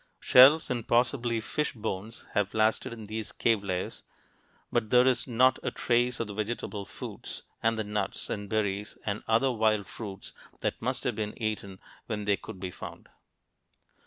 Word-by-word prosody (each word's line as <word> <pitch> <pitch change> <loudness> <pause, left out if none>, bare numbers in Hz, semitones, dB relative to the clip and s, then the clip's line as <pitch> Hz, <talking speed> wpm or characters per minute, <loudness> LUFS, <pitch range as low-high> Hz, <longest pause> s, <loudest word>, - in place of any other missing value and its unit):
Shells 135 +5 +7
and 120 -2 -2
possibly 120 -1 +2
fish 150 +7 -2
bones 110 -1 -5
have 105 0 0
lasted 110 +1 +2
in 115 -2 -7
these 110 +1 -4
cave 115 -3 +1
layers, 95 -2 -3 0.7
but 115 -3 +1
there 125 +1 +6
is 130 -1 +2
not 130 +1 +4
a - - -1
trace 120 0 +1
of 115 - 0
the 105 - -7
vegetable 105 -1 -3
foods - - -8 0.2
and 115 0 +2
the 110 - 0
nuts 105 -1 -3
and 100 -2 -4
berries 105 -1 -1
and 105 0 -2
other 115 +4 +3
wild 110 -3 +2
fruits 100 -3 -8 0.3
that - - -2
must 130 +3 -1
have 125 - 0
been 105 +1 -4
eaten 105 -4 -3 0.3
when 105 -3 -2
they 100 0 +3
could 95 - -10
be 90 -1 -4
found. - - -9
110 Hz, 170 wpm, -29 LUFS, 105-120 Hz, 0.7 s, Shells